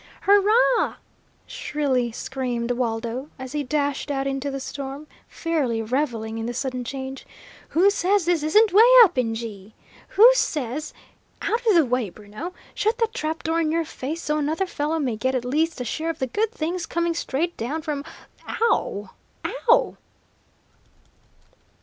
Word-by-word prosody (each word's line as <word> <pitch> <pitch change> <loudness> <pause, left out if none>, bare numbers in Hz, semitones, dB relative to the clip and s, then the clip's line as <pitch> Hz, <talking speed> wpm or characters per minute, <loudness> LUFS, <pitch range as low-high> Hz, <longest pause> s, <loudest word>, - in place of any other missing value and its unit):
"Hurrah!" 425 +5 +4 0.5
shrilly 260 -5 -1
screamed 245 -1 -3
Waldo, 240 +2 -2
as 260 -1 -7
he 295 +1 -1
dashed 285 +1 -1
out 275 -1 -1
into 275 +1 -2
the 275 0 -4
storm, 275 +2 -6 0.2
fairly 295 -9 -1
revelling 225 -2 -2
in 225 - -3
the 240 - -4
sudden 255 0 -2
change. 265 +1 -6 0.5
"Who 375 +5 +4
says 395 -1 +1
this 345 -2 +2
isn't 395 +7 +4
'way 415 - +8 0.2
up 370 -5 +2
in 225 -2 0
G?' 215 -3 -8 0.3
Who 430 +5 +7
says 300 - -1 0.5
out 460 +4 0
of 425 - +5
the 330 -3 +5
way, 250 -4 0
Bruno! 215 - -8 0.2
Shut 440 +3 0
that 455 -2 0
trap 320 -8 -3
door 330 0 +1
in 310 -1 0
your 330 0 0
face, 310 +4 -5
so 300 +1 0
another 315 +6 0
fellow 315 -2 -2
may 255 -8 -1
get 260 +3 0
at 245 -1 -1
least 310 +4 0
a 250 - -3
share 315 +8 -2
of 325 - -3
the 260 - -1
good 420 - -1
things 340 -3 -3
coming 340 0 0
straight 330 +1 -2
down 295 +8 -3
from 295 -2 -3 0.4
ow 205 - 0 0.6
wow!" - - +4
290 Hz, 160 wpm, -24 LUFS, 250-340 Hz, 0.6 s, way